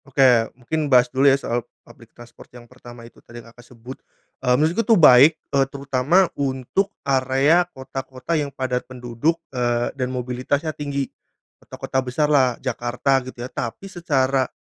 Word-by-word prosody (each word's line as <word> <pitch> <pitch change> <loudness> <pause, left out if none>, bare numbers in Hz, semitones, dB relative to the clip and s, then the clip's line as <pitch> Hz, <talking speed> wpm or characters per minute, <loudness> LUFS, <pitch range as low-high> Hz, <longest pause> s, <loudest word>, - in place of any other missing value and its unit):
Oke 130 -4 +3
mungkin 150 +4 -3
bahas 125 -1 +4
dulu 135 +2 +4
ya 135 - +4
soal 120 -3 -3 0.2
public 115 -3 -18
transport 120 0 -15
yang 120 - -14
pertama 120 -1 -14
itu 120 - -17
tadi 120 - -14
yang 115 -1 -13
Kakak 120 - -16
aku 120 - -21
sebut. 125 +3 -10 0.4
Eee, 125 -1 +2
menurutku 160 +9 +1
tuh 225 0 +3
baik 150 0 +7 0.3
terutama 140 +6 +1
untuk 135 +8 -2 0.2
area 135 +6 +2
kota-kota 130 +1 -7
yang 150 -3 0
padat 130 -2 -3
penduduk, 125 +5 -2 0.2
eee, 120 -1 -1
dan 130 -2 -3
mobilitasnya 130 +5 -3
tinggi. 140 -2 -3 0.6
Kota-kota 130 - -4
besar 130 +4 -1
lah 130 -4 +3
Jakarta 125 +2 -1
gitu 125 -1 -8
ya. - - -8
Tapi 125 +7 -5
secara, 135 -8 0
130 Hz, 160 wpm, -21 LUFS, 125-145 Hz, 0.6 s, baik